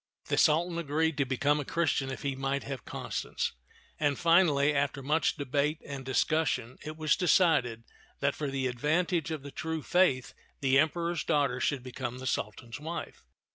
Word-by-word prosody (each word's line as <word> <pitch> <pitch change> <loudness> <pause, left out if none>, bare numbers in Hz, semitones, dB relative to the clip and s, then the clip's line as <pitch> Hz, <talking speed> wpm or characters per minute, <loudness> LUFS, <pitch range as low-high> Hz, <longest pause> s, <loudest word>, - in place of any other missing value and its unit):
The - - +1
Sultan 170 +3 +3
agreed 160 0 0
to 140 - +3
become 145 +3 +1
a - - -2
Christian 145 -3 0
if 130 - -6
he 140 -1 -1
might 135 +1 -1
have 135 -4 -6
Constance; - - -3 0.5
and 145 -3 +1
finally, 165 -4 +4
after 140 -1 -1
much 155 +4 +1
debate 145 +2 0
and 140 -2 -6
discussion, 130 -2 0
it 155 0 -7
was 155 -2 +2
decided 150 - +3 0.4
that 140 0 +1
for 150 -2 -3
the 135 -1 -2
advantage 155 +6 0
of 155 -4 -4
the 140 - -8
true 160 +2 -4
faith 175 -9 +2 0.3
the 135 -1 +4
Emperor's 170 +3 0
daughter 140 -5 +1
should 140 -2 0
become 125 -1 -5
the 130 - -8
Sultan's 115 +2 -3
wife. 165 +3 -6
145 Hz, 170 wpm, -30 LUFS, 135-160 Hz, 0.5 s, finally